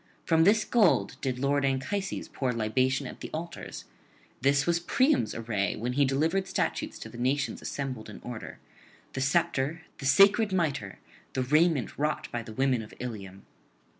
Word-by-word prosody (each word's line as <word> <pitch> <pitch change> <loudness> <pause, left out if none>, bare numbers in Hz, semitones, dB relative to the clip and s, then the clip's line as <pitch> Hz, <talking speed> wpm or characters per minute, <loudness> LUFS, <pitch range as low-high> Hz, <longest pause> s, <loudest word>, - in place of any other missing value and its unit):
From 160 -1 +4
this 210 +3 +4
gold 215 -7 +3
did 130 -2 -1
lord 140 +2 +1
Anchises 135 +10 -1
pour 130 -2 -2
libation 130 +4 +1
at - - -8
the - - -6
altars; 170 +2 -6 0.6
this 140 +1 +3
was 170 0 +2
Priam's 260 - +2
array 110 -4 -1
when 120 +3 -3
he 140 +2 +3
delivered 160 +8 +1
statutes - - -2
to - - -8
the 120 +1 -10
nations 135 +3 0
assembled 130 -6 -4
in 105 - -9
order; 120 -3 -7 0.6
the 135 - -3
sceptre, 160 +1 +1 0.2
the 135 - -2
sacred 200 +8 +6
mitre, 145 - -1 0.4
the 130 - 0
raiment 150 - +2
wrought 150 +1 -1
by 120 - -2
the 110 -1 -9
women 130 0 +1
of 105 - -11
Ilium. 100 -6 -7
135 Hz, 165 wpm, -28 LUFS, 125-165 Hz, 0.6 s, sacred